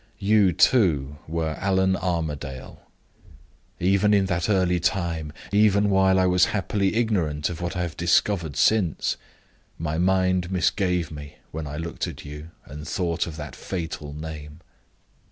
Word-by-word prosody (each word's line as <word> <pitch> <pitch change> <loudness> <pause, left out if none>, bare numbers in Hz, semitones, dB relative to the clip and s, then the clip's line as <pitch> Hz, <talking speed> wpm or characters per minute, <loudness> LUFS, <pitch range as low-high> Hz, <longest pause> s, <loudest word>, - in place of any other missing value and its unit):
You, 100 -1 +4
too, 75 - +3
were 80 -1 -2
Allan 95 0 +2
Armadale. 80 -7 -4 1.0
Even 100 +3 +3
in 100 -1 +3
that 90 0 -1
early 90 -3 +2
time 85 -3 -1 0.2
even 100 0 +4
while 95 -1 +4
I 95 - +3
was 90 -1 +4
happily 100 0 -1
ignorant 85 -10 0
of 85 0 -7
what 85 +2 -3
I 90 - 0
have 85 -1 -5
discovered 85 -2 +1
since 100 -8 +2 0.6
my 80 0 -2
mind 95 0 +2
misgave 90 -1 0
me 75 -1 -9 0.2
when 80 -1 -5
I 75 0 -6
looked 80 0 -4
at - - -8
you, 75 +2 -8 0.2
and 75 +2 -9
thought 85 0 -1
of 80 - -7
that 75 -4 -7
fatal 80 -5 -5
name. 75 +1 -8
85 Hz, 145 wpm, -24 LUFS, 75-95 Hz, 1.0 s, You